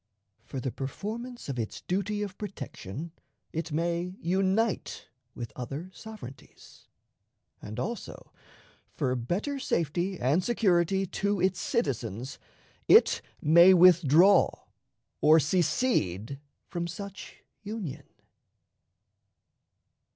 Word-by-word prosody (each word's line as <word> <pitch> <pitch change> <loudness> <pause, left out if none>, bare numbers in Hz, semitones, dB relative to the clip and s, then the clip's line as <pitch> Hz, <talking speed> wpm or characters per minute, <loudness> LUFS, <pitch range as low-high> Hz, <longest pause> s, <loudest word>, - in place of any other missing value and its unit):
For 135 - -5
the 130 0 -3
performance 220 - -6
of 135 -3 -3
its 110 - -4
duty 200 +3 -1
of 195 -2 -6
protection 165 - -7 0.4
it 165 +1 -3
may 170 +3 -1
unite 190 +5 0 0.3
with 120 -2 -7
other 140 +9 -6
sovereignties; 215 - -12 0.7
and 105 +1 -7
also, 230 -2 -6 0.6
for 130 0 0
better 190 - -2
safety 175 - -1
and 145 +9 +2
security 195 -4 +2
to 200 +2 -1
its 185 0 +1
citizens, 130 - -2 0.5
it - - +6 0.2
may 170 +5 +7
withdraw 180 +1 +6 0.7
or 155 +2 +7
secede 145 - 0 0.3
from 170 -2 -3
such 200 +3 -9 0.2
Union. 205 -9 -6
175 Hz, 95 wpm, -28 LUFS, 140-200 Hz, 0.7 s, may